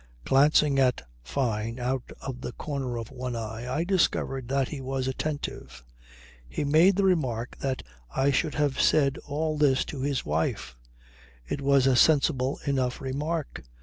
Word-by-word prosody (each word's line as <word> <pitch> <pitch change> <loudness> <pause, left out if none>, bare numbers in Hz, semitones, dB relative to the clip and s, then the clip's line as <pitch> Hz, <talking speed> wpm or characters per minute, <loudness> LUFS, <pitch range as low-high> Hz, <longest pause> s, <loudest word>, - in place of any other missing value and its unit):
Glancing 140 +1 +4
at 125 - +1
Fyne 115 - -2
out 125 +1 -2
of 125 -2 -6
the - - -5
corner 135 -5 -4
of 115 +1 -6
one 125 -2 -4
eye 115 +2 -5
I 150 +5 0
discovered 170 -8 0
that 135 0 0
he 145 -3 -6
was 130 0 -2
attentive. 130 - -4 0.6
He 65 - -2
made 160 +7 +5
the 200 - +1
remark 130 -11 0
that 135 -1 -2 0.3
I 135 - +1
should 150 +3 0
have 145 -3 +1
said 140 -3 +3
all 155 +1 -1
this 135 -3 +3
to 140 - -6
his 140 -1 -1
wife. 75 -4 -2 0.7
It 140 - -3
was 140 -1 +4
a 135 -1 +4
sensible 135 -1 +3
enough 130 -3 0
remark. 145 +4 -3
135 Hz, 155 wpm, -27 LUFS, 125-145 Hz, 0.7 s, made